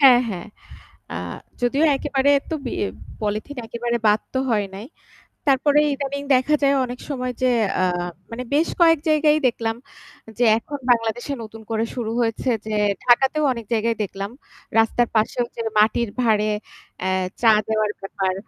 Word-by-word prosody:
হ্যাঁ, 255 -3 +8
হ্যাঁ। 185 -3 -5 0.7
আ - - -4 0.5
যদিও 275 +6 +2
একেবারে 280 -1 +1 0.2
তো 320 - -1
বি - - -3 0.5
পলিথিন 215 +6 -3
একেবারে 235 +1 -2
বাদ 210 +1 +4
তো 260 - +1
হয় 210 -3 +2
নাই। 205 +3 -7 0.6
তারপরে 285 +1 +4 0.2
ইদানিং 280 0 -4
দেখা 260 +4 +3
যায় 280 0 +4
অনেক 245 0 -6
সময় 255 -3 -2
যে - - +4 0.3
অ্যা 185 - +2 0.4
মানে 230 +2 -5
বেশ 315 +3 +3
কয়েক 330 -1 +6
জায়গায় 305 0 +4
দেখলাম, 225 -1 -2 0.6
যে 245 - +3
এখন 285 +4 -7
বাংলাদেশে 235 +3 +1
নতুন 220 0 -10
করে 225 0 0
শুরু 235 -3 -3
হয়েছে 230 +2 -1 0.2
যে 215 - -2 0.3
ঢাকাতেও 265 +5 +4
অনেক 235 -2 -6
জায়গায় 230 0 +1
দেখলাম। 195 +1 -5 0.5
রাস্তার 225 +1 +3
পাশেও 220 +3 +1
ওইযে 235 - -6 0.2
মাটির 220 +2 +3
ভারে 215 -2 +2 0.5
অ্যা 185 - 0 0.3
চা 225 -2 +7 0.2
দেওয়ার 215 -1 +1
ব্যাপার। 195 -1 -2
240 Hz, 155 wpm, -22 LUFS, 220-275 Hz, 0.7 s, হ্যাঁ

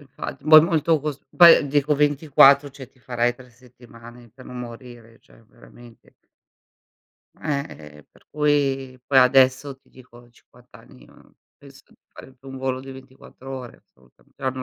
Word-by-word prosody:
Infatti, 140 0 -10
poi 155 -1 +10
molto 165 -2 0
cos 150 -1 -6 0.2
poi 170 -4 +7
dico 145 +1 0
24, 145 -1 +3
cioè 135 -2 -13
ti 135 - -32
farai 120 -1 -2
3 125 0 -18
settimane 120 -1 -18
per 130 - -16
non 125 - -10
morire, 120 -1 -12
cioè - - -24
veramente. 120 0 -20 1.2
Ehm, 140 -3 -4
e 75 -1 -14
e 75 - -18
per - - -27
cui 140 -3 -2
poi 135 -2 +3
adesso 130 +1 +2
ti 135 - -34
dico, 125 -2 -18
a 120 0 -20
50 125 +1 -25
anni, 65 - -18
uhm, - - -23 0.2
penso - - -18
di - - -25 0.2
fare 130 - -15
più 135 +2 -17
un 135 - -10
volo 130 -1 -4
di 135 0 -12
24, 130 0 -17
ore 130 -3 -9
assolutamen 65 -1 -31
però 130 - -4
non 130 0 -8
130 Hz, 170 wpm, -21 LUFS, 120-140 Hz, 1.2 s, poi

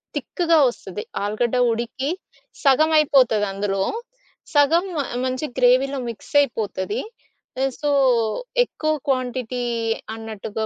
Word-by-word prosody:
తిక్‌గా 335 -2 +1
ఒస్తది. 205 -4 -7 0.2
ఆలుగడ్డ 215 +4 0 0.2
ఉడికి, 235 +4 -3 0.5
సగమైపోతది 275 -6 +4
అందులో. 195 0 -2 0.7
సగం 310 +5 +4
మ - - 0 0.3
మంచి 255 +4 -2
గ్రేవీలో 260 +2 +3
మిక్స్ 230 - -10
అయిపోతది. 210 -7 -2 0.8
సో, 295 - 0 0.8
ఎక్కువ 310 -8 -2 0.2
క్వాంటిటీ 250 -2 -1 0.5
అన్నట్టుగా 220 -1 -5
250 Hz, 90 wpm, -22 LUFS, 220-280 Hz, 0.8 s, సగమైపోతది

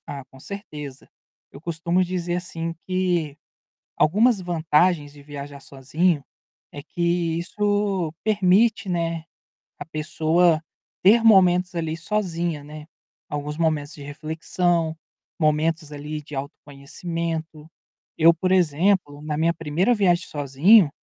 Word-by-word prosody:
Ah, 140 -1 -6
com 135 0 -18
certeza. 150 - -8 0.4
Eu 140 - -12
costumo 170 +2 0
dizer 175 -1 -2
assim 165 -2 -4
que, 175 -5 0 0.6
algumas 210 +7 +4
vantagens 165 -2 +1
de 145 - -14
viajar 140 0 -8
sozinho, 140 +4 -1 0.5
é 145 - -8
que 170 +1 -1
isso 200 -2 -1
permite, 205 0 +3
né, 165 -2 -1 0.6
a - - -6
pessoa 160 +1 +1 0.4
ter 225 +4 +6
momentos 180 -4 +5
ali 160 -1 -2
sozinha, 170 -4 -2
né, 150 +1 -10 0.4
alguns 150 +1 -4
momentos 155 -2 0
de 145 - -12
reflexão, 160 +3 -1 0.4
momentos 155 0 +1
ali 150 +1 -6
de 150 0 -14
autoconhecimento. 155 +3 -6 0.5
Eu, 165 +1 +7
por 185 +3 -1
exemplo, 175 -3 +2
na 150 0 -3
minha 165 +2 +2
1º 165 +8 +1
viagem 185 -5 +2
sozinho, 145 - +4
165 Hz, 115 wpm, -23 LUFS, 150-180 Hz, 0.6 s, Eu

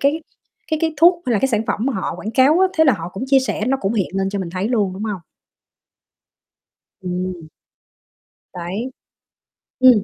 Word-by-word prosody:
cái 295 +4 +1 0.5
cái 315 - +1
cái 320 -1 +1
thuốc 345 +2 +5
hay 245 - +1
là 215 - +3
cái 270 - +1
sản 220 -3 +1
phẩm - - -1
mà 275 - +1
họ - - -3
quảng 215 - -5
cáo 270 +7 +4
á, 380 - +6
thế 320 - +7
là 270 - +5
họ 170 -4 -4
cũng 195 +7 -5
chia 270 0 +5
sẻ 215 -4 -2
nó 270 +2 +2
cũng 195 +3 -1
hiện 200 -5 0
lên 195 0 0
cho 200 - -3
mình 185 -3 -4
thấy 185 +4 -2
luôn, 210 -6 +1
đúng 195 - -6
hông? 205 -5 -3 1.8
Ừm. 180 -2 -4 1.1
Đấy. 190 +8 -4 0.9
Ừm. 250 -5 +6
220 Hz, 195 wpm, -20 LUFS, 190-270 Hz, 1.8 s, thế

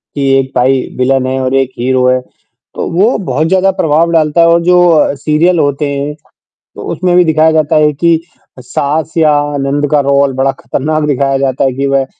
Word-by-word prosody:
कि 140 -1 -1
एक 130 0 -4
भाई 130 +1 +2 0.2
विलन 130 +1 +1
है 130 0 -2
और 130 0 -2
एक 135 -1 +1
हीरो 125 +1 +1
है, 130 0 +2
तो - - -11
वो 195 +8 +1
बहुत 160 -5 -2
ज़्यादा 190 +2 +2
प्रभाव 160 +2 +1
डालता 160 0 +2
है 165 - +5
और 170 0 +3
जो 175 -4 +3
सीरियल 160 +4 +1
होते 145 0 0
हैं, 140 +2 -4 0.6
तो - - -9
उसमें 180 -1 -1
भी 180 - +5
दिखाया 160 0 +2
जाता 155 0 +1
है 150 0 +3
कि 165 +2 +1 0.4
सास 145 +5 -3
या 155 -2 +3 0.3
नंद 140 +1 -1
का 150 - +2
रोल 140 0 +1
बड़ा 135 +1 0
खतरनाक 155 +2 -2
दिखाया 135 -1 0
जाता 135 -1 -1
है 135 - 0
कि 135 +2 -3
वह 135 -1 0
145 Hz, 195 wpm, -11 LUFS, 135-160 Hz, 0.6 s, है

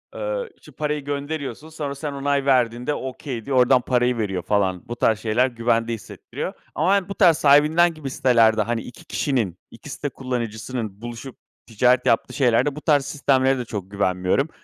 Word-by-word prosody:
Eee, - - -3
işte 150 - -16
parayı 150 0 -3
gönderiyorsun. 145 0 -4
Sonra 145 -3 -5
sen 145 +1 -5
onay 140 0 0
verdiğinde 125 0 +2
"okay" 130 -4 -6
diyor. 135 -2 0
Oradan 125 0 +5
parayı 125 -1 +1
veriyor, 95 -5 -2
falan. 95 -2 0
Bu 120 - -3
tarz 110 -2 +2
şeyler 115 +4 +2
güvende 115 -1 0
hissettiriyor 110 -5 -7 0.2
ama 195 - +3
yani 200 -1 -1
bu 200 - -5
tarz 170 -5 +5
sahibinden 155 +4 +5
gibi 155 -4 -7
sitelerde, 115 -4 +3
hani, 115 +1 -1
2 125 - -12
kişinin, 115 - -1
2 130 +6 -12
site 145 +1 -4
kullanıcısının 115 -4 -5
buluşup, 120 +2 -8 0.3
ticaret 125 +3 +2
yaptığı 115 - +1
şeylerde 135 +2 +2
bu 150 - -8
tarz 145 -4 +2
sistemlere 135 -2 +2
de 125 - -4
çok 100 -4 -6
güvenmiyorum. 95 - 0
130 Hz, 170 wpm, -22 LUFS, 115-145 Hz, 0.3 s, Oradan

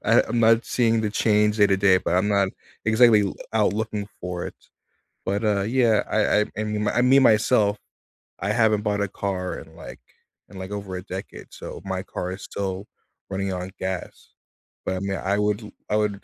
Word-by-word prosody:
I - - +5
I'm 120 - -1
not 115 +1 +4
seeing 115 -2 +2
the 110 - 0
change 105 0 +2
day 105 -1 +5
to 95 -1 +1
day, 95 -2 +5
but 90 - -1
I'm 95 +3 +2
not 100 -2 +2 0.4
exactly 110 -1 +5
l 95 - -3 0.2
out 105 -2 +3
looking 105 -1 -3
for 90 -1 -4
it. - - -8 0.7
But, 100 +3 -1
uh, 105 -2 +2
yeah, 115 0 +3
I 105 -1 +3
I - - +2 0.2
I - - -1
mean 105 0 -1
I 125 - +2
mean, 135 +2 +5
myself? 105 -3 +3 0.6
I 100 - -1
haven't 110 -2 +2
bought 105 -1 0
a 100 - 0
car 95 -2 -3
in, 80 0 -12
like 80 -4 -10 0.5
in, 95 - -10
like, 95 +1 -7
over 100 -2 -5
a 90 - -6
decade, 95 +1 -8
so - - -8
my 95 -1 -2
car 90 -1 -5
is 95 - -8
still 95 0 -4 0.4
running 95 0 -2
on 90 +1 -5
gas. 95 -1 -5 0.6
But, 95 - -1
I - - -3
mean, 95 0 -2
I 100 +2 0
would 105 +1 0
l 105 - -10 0.2
I 105 - +2
would 105 -2 -1
105 Hz, 205 wpm, -24 LUFS, 95-110 Hz, 0.7 s, I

